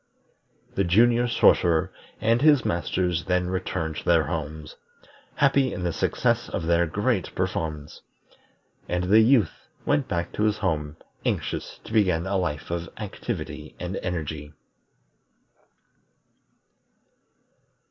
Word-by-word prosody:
The 100 - +1
Junior 120 +7 +4
Sorcerer 85 -8 +3 0.3
and 115 +2 +2
his 145 -3 +5
Masters 85 0 -1
then 90 -1 0
returned 80 -4 -3
to - - -5
their 85 -2 +4
homes, 80 -2 -5 0.6
happy 140 -1 +3
in 90 - -5
the 85 -1 -1
success - - 0
of - - -3
their 85 +1 +3
great 105 +2 -1
performance; 75 -2 -3 0.9
and 90 0 0
the 100 +5 +5
Youth 110 -5 +3 0.2
went 145 -2 +1
back 85 0 -2
to 105 - -1
his 105 -1 +1
home 75 -5 -2 0.3
anxious - - -2
to - - -10
begin 95 -6 +2
a 100 +1 -1
life 75 -4 -3
of 85 0 -3
activity 105 -3 -6
and 90 +2 -4
energy. 80 -4 -4
90 Hz, 120 wpm, -25 LUFS, 80-110 Hz, 0.9 s, his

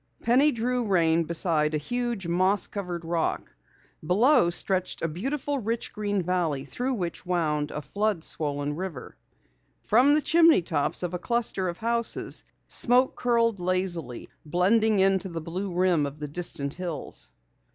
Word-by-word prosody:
Penny 265 +6 +4
drew 245 +1 -1
rein 170 -5 +2
beside 155 -2 +1
a - - +2
huge, 240 +3 -3
moss 185 +4 +2
covered 180 -4 -5
rock. 165 -1 -2 0.5
Below 200 - +4
stretched 185 +1 0
a - - +2
beautiful 270 - -3
rich, 230 0 -3
green 205 -2 -1
valley 165 -6 -1
through 250 - -2
which 175 -5 -4
wound 155 -5 -1
a 150 - -6
flood 200 +3 -1
swollen 145 -2 -1
river. 175 -6 -6 0.7
From 260 +7 +4
the 305 - +1
chimney 325 - +5
tops 155 +1 -1
of 180 0 -3
a 180 - -3
cluster 230 -5 -1
of 170 - -6
houses 235 0 0 0.2
smoke 250 +2 +3
curled 230 -4 +1
lazily, 175 -8 -2 0.2
blending 200 +6 +2
into 190 0 +2
the 165 -1 -5
blue 180 +5 -5
rim 175 -4 +2
of 140 +1 -9
the 150 0 -5
distant 145 -2 -3
hills. 175 - -5
185 Hz, 150 wpm, -26 LUFS, 165-230 Hz, 0.7 s, chimney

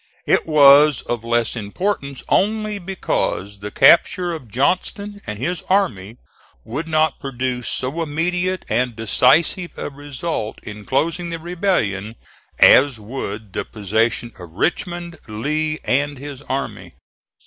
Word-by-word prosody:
It - - +2
was 145 -2 +6
of 120 -2 -3
less 120 0 0
importance 140 - -3
only 215 0 +1
because 170 - -2
the 105 +1 -6
capture 175 - +4
of 155 -7 -7
Johnston 185 - -1
and 105 - -4
his 170 +10 -2
army 120 - 0 0.5
would 145 +8 -5
not 155 -2 +1
produce 125 -2 -3
so 135 +6 -2
immediate 175 +4 -1
and 125 -2 0
decisive 135 - +2
a - - -5
result 145 -4 -5
in 105 -1 -9
closing 170 +5 -1
the 165 - -4
rebellion 160 - -1 0.4
as 135 -4 +6
would 105 -3 -6
the - - -2
possession 110 +3 -1
of 85 -3 -11
Richmond, 170 - -2
Lee 150 +8 -2
and 145 +2 +1
his 140 0 -8
army. 135 +1 -4
140 Hz, 125 wpm, -20 LUFS, 115-170 Hz, 0.5 s, was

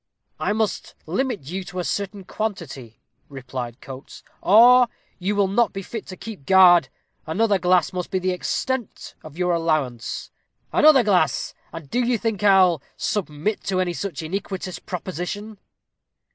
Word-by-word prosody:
"I - - 0
must 215 0 -2
limit 225 - -1
you 180 +7 -5
to 180 - -9
a 180 - -1
certain 200 +1 -3
quantity," 165 - -6 0.3
replied 125 -2 -7
Coates, 135 0 -11 0.2
"or 245 +5 +7 0.3
you 195 +3 -1
will 200 -1 +3
not 220 +4 +1
be 195 - -5
fit 225 +3 -7
to 185 - -8
keep 205 -12 -9
guard 175 -6 +7 0.4
another 200 +4 +2
glass 180 +1 +2
must 180 -1 -4
be 190 - -1
the 185 0 0
extent 240 +6 -3
of 155 0 -12
your 180 -1 +1
allowance." 155 -8 -2 0.4
"Another 300 -4 +6
glass! 200 -4 +1 0.2
and 165 -3 -9
do 240 - -1
you 240 0 +1
think 220 -2 -2
I'll 190 -6 +5 0.2
submit 195 +1 -2
to 185 -1 0
any 180 -1 0
such 170 -3 -5
iniquitous 190 +1 -4
proposition?" 190 +4 -6
185 Hz, 150 wpm, -23 LUFS, 165-210 Hz, 0.4 s, or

